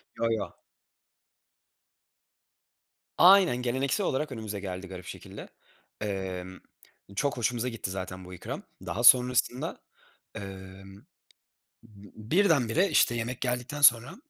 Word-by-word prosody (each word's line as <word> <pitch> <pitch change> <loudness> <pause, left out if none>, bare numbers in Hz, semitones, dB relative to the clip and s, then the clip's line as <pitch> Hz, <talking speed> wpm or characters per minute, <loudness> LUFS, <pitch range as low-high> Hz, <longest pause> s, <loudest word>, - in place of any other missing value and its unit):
Yo 115 - 0
yo. 110 -2 -3 2.6
Aynen, 185 -7 +6
geleneksel 130 - -1
olarak 150 0 -1
önümüze 110 -4 -5
geldi 95 -1 -6
garip 90 -1 -9
şekilde. - - -10 0.5
Emm, 95 -3 -5 0.6
çok 140 +5 -1
hoşumuza 120 +1 -1
gitti 115 -5 -5
zaten 95 -1 -6
bu 90 - -11
ikram. 90 - -7 0.2
Daha 120 - -3
sonrasında, 125 0 +4 0.5
emm, 95 0 -10 0.9
b 105 0 -15
birdenbire 170 - +3
işte 120 - +3
yemek 120 +1 -4
geldikten 125 +3 -3
sonra 120 -3 +5
115 Hz, 105 wpm, -28 LUFS, 95-125 Hz, 2.6 s, Aynen